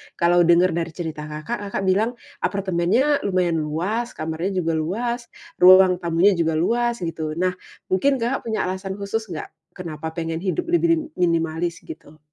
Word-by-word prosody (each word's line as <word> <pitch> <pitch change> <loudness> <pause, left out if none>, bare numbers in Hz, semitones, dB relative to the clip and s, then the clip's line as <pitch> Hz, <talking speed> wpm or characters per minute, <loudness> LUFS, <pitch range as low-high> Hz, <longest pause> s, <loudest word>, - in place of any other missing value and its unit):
kalo 175 0 +3
denger 175 +1 +5
dari 170 0 -1
cerita 155 -3 -5
Kakak, 155 +10 -5
Kakak 195 - -3
bilang 210 +6 +1 0.2
apartemennya 200 +9 +1
lumayan 180 -4 +1
luas 180 +11 -2
kamarnya 160 +5 -3
juga 165 - 0
luas, 235 +8 -2 0.3
ruang 185 0 +7
tamunya 170 +3 +3
juga 165 -3 0
luas 235 +4 0
gitu 160 -2 -3
nah 185 +1 +1 0.4
mungkin 270 +9 +3
Kakak 240 -1 -2
punya 220 - -1
alasan 190 +1 -4
khusus 205 +2 -3
gak, - - -7 0.2
kenapa 160 -2 -6
pengen 165 -1 -3
hidup 200 - -1
lebih 345 0 +2
rim 320 - -3 0.2
minimalis 165 0 0
gitu? 155 -1 -11
180 Hz, 155 wpm, -22 LUFS, 165-210 Hz, 0.4 s, ruang